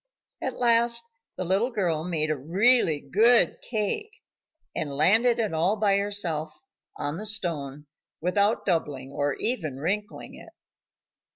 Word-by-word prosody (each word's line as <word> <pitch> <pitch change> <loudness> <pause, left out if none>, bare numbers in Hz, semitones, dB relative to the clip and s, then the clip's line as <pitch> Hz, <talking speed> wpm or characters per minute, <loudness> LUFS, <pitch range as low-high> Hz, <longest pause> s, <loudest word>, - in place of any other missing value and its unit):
At - - -4
last 235 -1 +2 0.3
the - - -2
little 195 +7 +1
girl 175 -9 -1
made 160 -3 -1
a - - 0
really 170 - +2
good 220 - +3
cake 245 - -2 0.7
and 145 -3 -3
landed 225 +10 +4
it 215 -6 -1
all 170 +6 +1
by 200 -2 +2
herself 175 -7 -1 0.4
on 145 +2 -3
the 210 - -6
stone, 150 -8 -1 0.3
without 200 +6 +1
doubling, 145 -7 -2
or 145 0 -1
even 175 - -1
wrinkling, 200 +8 -4
it. - - -14
185 Hz, 130 wpm, -26 LUFS, 155-220 Hz, 0.7 s, landed